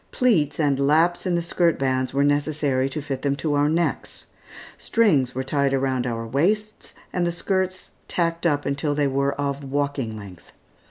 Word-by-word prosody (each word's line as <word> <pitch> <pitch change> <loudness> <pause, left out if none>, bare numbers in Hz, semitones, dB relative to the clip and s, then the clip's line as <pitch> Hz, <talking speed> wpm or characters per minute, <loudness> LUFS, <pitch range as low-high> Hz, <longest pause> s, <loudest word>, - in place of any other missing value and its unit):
Pleats 170 - +2
and 140 -3 +2
laps 170 +5 +2
in 180 - +1
the 170 - 0
skirt 170 -1 +1
bands 130 -1 0
were 140 +1 +1
necessary 145 -2 +1
to 145 +2 -4
fit 135 -3 -4
them 140 -1 0
to 150 +1 -2
our 145 +1 +2
necks. 170 +2 -1 0.5
Strings 150 - +2
were 130 - -1
tied 140 0 +1
around 130 -2 0
our 115 -1 -3
waists, 210 - -1 0.2
and 180 - 0
the - - 0
skirts 185 +1 -2 0.2
tacked 170 0 0
up 145 -2 0
until 145 +1 -1
they 145 -1 +1
were 140 0 +1
of 140 0 -3
walking 140 -5 -2
length. 95 -4 -12
145 Hz, 175 wpm, -23 LUFS, 135-170 Hz, 0.5 s, Pleats